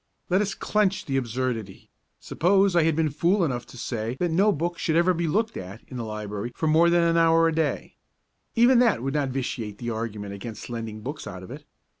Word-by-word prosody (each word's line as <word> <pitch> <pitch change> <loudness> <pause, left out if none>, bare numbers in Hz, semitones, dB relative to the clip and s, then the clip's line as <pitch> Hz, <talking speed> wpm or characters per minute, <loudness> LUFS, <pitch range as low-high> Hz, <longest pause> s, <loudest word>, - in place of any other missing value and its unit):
Let 185 +3 +4
us 205 -1 -2
clench 205 -2 0
the 135 - -2
absurdity: 120 -5 -3 0.3
suppose 195 +2 +2
I 170 - +5
had 160 -1 +2
been 160 -2 +1
fool 175 +6 +2
enough 125 -5 -3
to - - -13
say 115 0 -3
that 175 -2 0
no 195 +6 +4
book 170 +1 -2
should 160 - 0
ever 175 +2 +4
be 170 -1 -1
looked 220 +7 0
at 95 +4 -8
in 130 - -9
the 120 - -3
library 105 +1 -5
for - - -2
more 160 +2 +5
than 170 0 +4
an 170 0 +2
hour 165 0 +5
a 165 - 0
day; 160 -1 -2 0.6
even 240 +1 +5
that 230 - +3
would 135 +1 -2
not 145 -3 0
vitiate 120 -5 -4
the 120 +1 -4
argument 110 -3 -4
against 105 +3 -8
lending 115 -2 -5
books 145 +7 -6
out 95 -1 -8
of 95 - -10
it. 145 +2 -9
150 Hz, 220 wpm, -25 LUFS, 115-170 Hz, 0.6 s, I